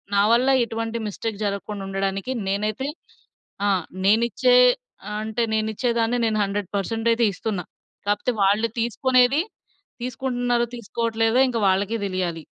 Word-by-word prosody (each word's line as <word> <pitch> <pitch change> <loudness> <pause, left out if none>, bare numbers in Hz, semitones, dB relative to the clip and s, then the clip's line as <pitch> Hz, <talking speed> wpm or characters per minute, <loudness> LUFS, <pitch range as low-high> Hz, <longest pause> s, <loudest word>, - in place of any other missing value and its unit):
నా 200 - +5
వల్ల 250 +3 +4
ఎటువంటి 225 0 -3
మిస్టేక్ 210 +1 -4
జరక్కుండ 200 0 -3
ఉండడానికి 195 +4 -2 0.2
నేనైతే 215 +7 -1 0.8
ఆ! - - +3 0.4
నేనిచ్చే 235 - +4 0.6
అంటే 220 +2 -1
నేను 220 0 +1
ఇచ్చే 245 +3 0
దాన్నే 230 +2 +1
నేను 220 -1 +1
100% 205 +3 -2
అయితే 230 +1 +2
ఇస్తున్నా. 195 -2 -3 0.4
కాకపోతే 205 +5 +1
వాళ్ళు 210 +4 +3
తీసుకునేది 255 +4 +3 0.6
తీసుకుంటున్నారో? 245 -1 0
తీసుకోవట్లేదో? 230 +2 0
ఇంక 230 -2 -1
వాళ్ళకే 200 +4 0
తెలియాలి. 180 -3 -2
225 Hz, 120 wpm, -23 LUFS, 200-240 Hz, 0.8 s, నా